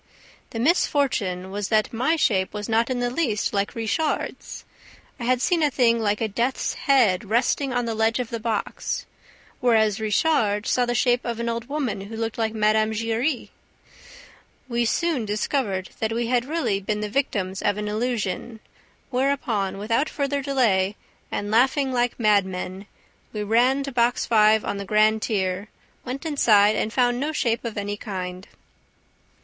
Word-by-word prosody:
The - - -7
misfortune 235 - +1
was 200 0 -3
that 215 +1 +1
my 260 +8 +1
shape 195 - +1
was 210 0 -4
not 225 +1 +2
in 250 -1 -1
the 245 0 0
least 245 -8 -1
like 200 0 -1
Richard's. 230 +8 -2 0.5
I 235 - -4
had 250 0 +1
seen 345 -2 +2
a 300 - +4
thing 235 -3 +3
like 210 0 0
a 225 - +1
death's 235 +5 -1
head 225 -10 +2
resting 255 +4 +1
on 245 -1 0
the 230 - -2
ledge 220 +1 +1
of 245 -2 -3
the 230 - -3
box, 220 -2 -3 0.5
whereas 220 -3 +3
Richard 215 -1 +1
saw 245 -1 +1
the 240 - 0
shape 245 +1 +2
of 235 -1 -4
an 235 - -2
old 235 +1 -3
woman 260 -9 -2
who 215 +3 -8
looked 225 0 -3
like 225 0 -1
Mme. 215 0 +2
Giry. 230 +5 -1 1.2
We 235 -1 0
soon 320 +1 0
discovered 205 -2 -2
that 220 0 -1
we 235 +1 -1
had 245 0 +1
really 295 -9 -1
been 210 +2 -2
the 210 - -2
victims 200 -6 -2
of 205 0 +1
an 210 0 -3
illusion, 220 0 -2 0.5
whereupon, 250 -7 0
without 230 +9 0
further 280 -1 -1
delay 220 -8 +1 0.4
and 205 +1 -3
laughing 265 +4 +3
like 245 0 0
madmen, 195 -2 0 0.5
we 210 -1 -3
ran 245 +6 +3
to 275 - -5
Box 240 -1 +1
Five 215 -1 +4
on 200 - -2
the 200 - -4
grand 215 +2 +3
tier, 190 -2 -1 0.4
went 260 +5 -6
inside 215 -9 +4
and 215 - -1
found 245 0 +2
no 295 +3 -1
shape 235 -6 0
of 230 -3 -5
any 205 0 -3
kind." 185 -2 -6
225 Hz, 165 wpm, -24 LUFS, 210-250 Hz, 1.2 s, a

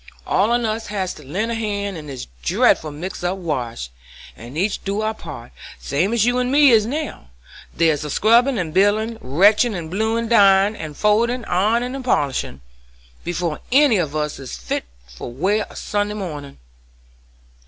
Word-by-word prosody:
All 205 +3 +2
on 240 0 +1
us 220 +1 -2
has 195 -3 -3
to 150 - -13
lend 190 - -2
a - - -1
hand 205 -3 -3
in 155 -2 -8
this 135 -3 -6 0.2
dreadful 155 - +2
mixed 170 +6 -7
up 180 +2 -1
wash, 125 - -4 0.4
and 120 +6 -10
each 195 +4 -1
do 200 +2 -2
our 220 0 -1
part, 145 - -10 0.3
same 165 +9 -1
as 230 -2 +2
you 245 +1 +2
and 250 0 0
me 285 -1 +6
is 220 -2 +4
now. 290 - -5 0.4
There's 160 -3 +1
scrubbin' 235 - +4
and 165 -5 -3
bilin', 215 +4 +2
wrenchin' 205 - +3
and 165 -3 -6
bluein', 220 +4 0
dryin' 200 -2 +5
and 155 -6 -7
foldin', 230 +3 +2
ironin' 225 +7 +1
and 270 -1 -5
polishin', 140 - -1 0.6
before 175 -2 -2
any 270 -4 +5
of 155 -5 -2
us 150 -1 -2
is 130 - -7
fit - - -3 0.2
for 60 - -9
wear 195 - 0
a - - -14
Sunday 205 0 -2
mornin'." 150 -8 -6
200 Hz, 170 wpm, -21 LUFS, 155-225 Hz, 0.6 s, me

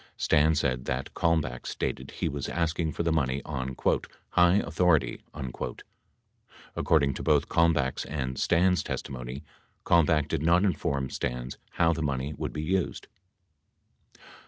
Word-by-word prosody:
Stans 75 +1 +3
said 65 -2 -1
that 65 0 -3
Kalmbach 80 -7 0
stated - - -3
he - - -3
was 70 -1 -3
asking 85 -1 -1
for 85 - -3
the 85 - +1
money 70 -4 0
on 65 -3 -4 0.5
"high 90 0 +5
authority." 85 -10 +2
72 65 -4 -5 1.0
According 70 -4 +2
to - - -6
both 75 -1 +2
Kalmbach's 75 -6 +2
and 65 -3 -3
Stans' 90 0 +3
testimony, 65 0 -5 0.4
Kalmbach 80 -3 +4
did - - -1
not 85 +3 +4
inform 70 -8 0
Stans 60 +1 -4
how 85 0 +3
the 80 - -4
money 70 -1 -2
would - - -4
be 75 - -4
used. 95 +3 -1
75 Hz, 135 wpm, -28 LUFS, 65-85 Hz, 1.0 s, high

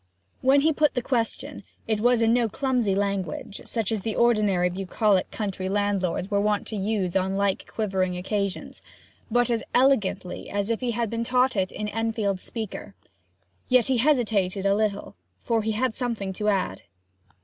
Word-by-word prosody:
When 270 +2 +5
he 315 +2 +3
put 300 0 +2
the 245 - -1
question, 235 -3 -2 0.2
it 220 -2 0
was 245 0 +4
in 225 0 +4
no 240 -2 +2
clumsy 245 -5 0
language, 200 -2 -2
such 225 -4 -1
as 220 -3 -1
the 220 +2 -3
ordinary 210 -6 +3
bucolic 195 +2 +1
county 190 -3 -3
landlords 200 -2 0
were 200 0 +2
wont 210 0 +1
to 220 - -4
use 200 -3 -1
on 190 +1 +1
like 200 -1 -1
quivering 190 -4 -1
occasions, 200 +1 -3 0.5
but 245 +1 +2
as 230 -1 0
elegantly 245 -8 +1
as 205 +2 -1
if 230 - 0
he 250 - -1
had 230 -1 -1
been 230 0 -1
taught 250 +1 +2
it 190 -2 0
in 210 - -4
Enfield's 220 -3 -1
Speaker. 215 -3 -6 0.7
Yet 250 -3 +5
he 260 -2 +1
hesitated 215 -8 +1
a 195 - +4
little 210 -1 -1 0.3
for 230 -2 +1
he 220 +1 -1
had 245 +2 0
something 225 -7 -2
to 210 +2 -1
add. 190 - -1
210 Hz, 170 wpm, -25 LUFS, 195-235 Hz, 0.7 s, When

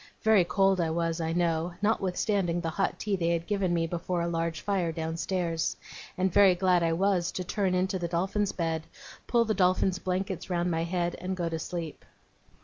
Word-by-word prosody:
Very 220 -4 +5
cold 195 +1 +2
I 165 - 0
was, 165 0 -1
I 160 0 -1
know, 170 0 0
notwithstanding 195 -3 0
the 165 - -2
hot 195 +4 -1
tea 210 -2 -1
they 170 -3 0
had 170 -1 0
given 195 -3 0
me 165 -1 +1
before 175 +1 -2
a - - -1
large 165 -1 -2
fire 190 -5 0
downstairs; 165 +1 -2 0.4
and 185 -1 +1
very 195 -3 +6
glad 180 -1 +3
I 165 -1 +2
was 180 0 +1
to 185 - -3
turn 185 0 0
into 185 +1 0
the 175 - -2
Dolphin's 190 +4 0
bed, 165 -2 -2 0.4
pull 235 -1 +3
the 220 - +1
Dolphin's 185 -1 +2
blankets 185 0 -3
round 175 0 0
my 165 0 0
head, 175 0 -1
and 185 +1 -3
go 170 -2 -1
to 165 -1 -3
sleep. 165 -2 -5
175 Hz, 195 wpm, -28 LUFS, 165-190 Hz, 0.4 s, very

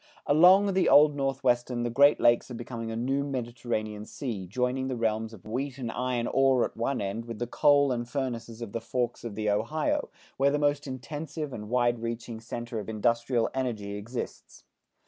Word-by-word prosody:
Along 185 +7 +6
the 185 0 +3
Old 150 0 +7
Northwest 135 -3 +1
the 120 -1 -2
Great 140 +4 +5
Lakes 120 +2 +3
are 125 - -6
becoming 115 -1 -6
a 115 - -4
new 135 +4 0
Mediterranean 120 -5 -3
Sea 110 -10 -5
joining 125 +5 -1
the 130 - -2
realms 110 -1 -1
of 110 -5 -14
wheat 130 +5 -3
and 120 -4 -4
iron 125 -1 -1
ore, 135 -1 +3
at - - -7
one 120 +4 -1
end 100 +4 -3
with 115 -2 -6
the 120 - -2
coal 145 +2 +4
and 120 -1 -2
furnaces 120 -4 -4
of 110 - -7
the 115 - -3
forks 120 +1 -2
of 115 -4 -6
the 105 0 -2
Ohio, 150 +9 0 0.3
where 140 +1 +4
the 145 - +1
most 145 0 +1
intense 145 +5 -6
and 130 -9 -4
wide 120 -1 +2
reaching 115 0 -5
center 115 0 -5
of 105 - -7
industrial 115 +2 +1
energy 115 -6 -3
exists. 115 +5 -7
120 Hz, 185 wpm, -28 LUFS, 115-135 Hz, 0.3 s, Old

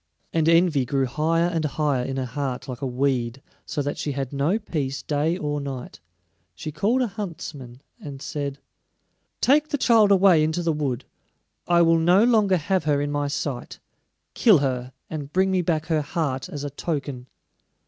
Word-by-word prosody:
And 160 -1 +2
envy 165 -4 +4
grew 135 +2 0
higher 160 +6 +1
and 170 -2 -1
higher 145 -3 0
in 135 +1 -4
her 130 - -1
heart 130 +1 -4
like 125 -3 -6
a 135 - -1
weed, 125 -1 -1 0.3
so 150 -1 -2
that 145 - -3
she 145 - -2
had 135 0 -4
no 145 +9 +1
peace 140 -10 -3
day 155 +4 0
or 145 -4 -2
night. 135 - -7 0.6
She 155 - -6
called 235 - +1
a - - 0
huntsman, 160 - -7 0.2
and 140 -2 -8
said: 140 -1 -4 0.8
"Take 295 +3 +4
the 290 - 0
child 225 -5 +5
away 185 -5 +6
into 160 +3 0
the 165 -1 +1
wood; 140 -5 -2 0.6
I 170 0 +5
will 165 0 +4
no 175 +5 +5
longer 215 -6 +4
have 175 +1 0
her 145 -2 +2
in 145 0 -2
my 145 0 -1
sight. 140 -3 -4 0.6
Kill 215 -7 +5
her, 130 -3 -2 0.2
and 145 -3 -6
bring 190 +2 +2
me 185 -1 +2
back 160 -3 0
her 160 -2 +1
heart 145 -3 -2
as 145 -1 -6
a 145 - -4
token." 140 -4 -4
150 Hz, 180 wpm, -24 LUFS, 135-175 Hz, 0.8 s, away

